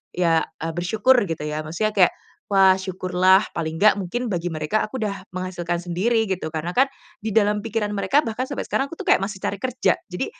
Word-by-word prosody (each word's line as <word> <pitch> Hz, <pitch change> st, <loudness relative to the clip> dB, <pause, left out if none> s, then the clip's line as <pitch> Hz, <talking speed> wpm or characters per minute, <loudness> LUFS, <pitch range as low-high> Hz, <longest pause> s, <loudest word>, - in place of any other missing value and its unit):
ya 165 Hz, -2 st, +2 dB, 0.2 s
eee, 165 Hz, -, -2 dB
bersyukur 215 Hz, +9 st, +3 dB
gitu 165 Hz, -2 st, -4 dB
ya 150 Hz, 0 st, -3 dB
maksudnya 195 Hz, +8 st, -1 dB
kayak, 185 Hz, -3 st, +5 dB, 0.3 s
"Wah 190 Hz, -2 st, +5 dB
syukurlah" 185 Hz, 0 st, +3 dB, 0.2 s
paling 160 Hz, -1 st, -2 dB
nggak, 215 Hz, 0 st, +6 dB
mungkin 235 Hz, +6 st, -3 dB
bagi 175 Hz, -1 st, -2 dB
mereka 155 Hz, +7 st, 0 dB
aku 215 Hz, -, -10 dB
udah 205 Hz, -2 st, -3 dB
menghasilkan 180 Hz, -2 st, -3 dB
sendiri 195 Hz, +7 st, +1 dB
gitu. 185 Hz, -4 st, -2 dB
Karena 160 Hz, +3 st, -2 dB
kan 265 Hz, +2 st, +5 dB, 0.3 s
di 220 Hz, -2 st, -4 dB
dalam 210 Hz, -1 st, +3 dB
pikiran 215 Hz, 0 st, -2 dB
mereka 210 Hz, +8 st, +2 dB
bahkan 230 Hz, +3 st, -3 dB
sampai 285 Hz, -, -4 dB
sekarang 270 Hz, -, 0 dB
aku -, -, -6 dB
tuh -, -, -4 dB
kayak -, -, +6 dB
masih 195 Hz, -1 st, -5 dB
cari 200 Hz, -, -1 dB
kerja, 255 Hz, +3 st, +1 dB
jadi 180 Hz, -1 st, -3 dB
190 Hz, 200 wpm, -23 LUFS, 175-215 Hz, 0.3 s, nggak